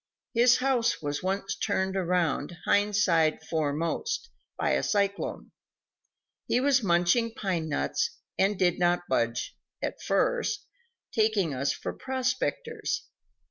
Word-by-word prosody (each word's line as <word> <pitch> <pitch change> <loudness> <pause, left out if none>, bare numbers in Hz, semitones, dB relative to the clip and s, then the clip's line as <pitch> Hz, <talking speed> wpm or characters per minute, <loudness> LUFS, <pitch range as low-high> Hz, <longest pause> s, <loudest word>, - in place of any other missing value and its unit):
His 240 +2 +5
house 255 -2 +1
was 145 -1 -3
once 195 +1 -2
turned 190 -2 -1
around, 175 -3 0
hind 205 0 +3
side 165 -6 +3
foremost, 160 - -1 0.3
by - - +1
a - - +2
cyclone. 200 -1 -1 1.0
He 245 - +2
was 270 0 +3
munching 195 +5 +2
pinenuts, 160 - -1 0.3
and 200 +1 +2
did 180 -1 +2
not 175 0 +2
budge, 115 -2 0 0.2
at - - -4
first, - - 0 0.5
taking 215 -8 +2
us 140 +2 0
for - - -4
prospectors. 265 - -2
195 Hz, 115 wpm, -28 LUFS, 165-240 Hz, 1.0 s, His